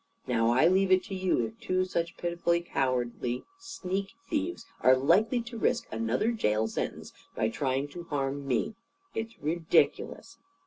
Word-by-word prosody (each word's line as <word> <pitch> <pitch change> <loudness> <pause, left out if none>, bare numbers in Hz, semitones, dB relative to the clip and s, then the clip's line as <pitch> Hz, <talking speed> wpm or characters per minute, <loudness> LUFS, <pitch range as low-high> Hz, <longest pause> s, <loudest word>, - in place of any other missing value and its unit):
Now, 115 -2 +2
I 125 +6 +4
leave 190 +2 +4
it 185 0 +5
to 205 - -7
you 185 -10 +1
if 110 0 -9
two 185 0 0
such 170 -2 -2
pitifully 170 0 +1
cowardly 125 -5 -1 0.2
sneak 195 - -4
thieves 320 +2 -2 0.2
are 130 +2 +6
likely 205 - +3
to 235 -1 -7
risk 240 - +1
another 115 - 0
jail 110 - +1
sentence - - -4 0.2
by 110 - +1
trying 135 +3 -1
to 170 +4 -8
harm 140 -2 -2
me. 125 - 0 0.4
It's 225 +1 -4
ridiculous. 160 +2 0
170 Hz, 150 wpm, -29 LUFS, 125-190 Hz, 0.4 s, are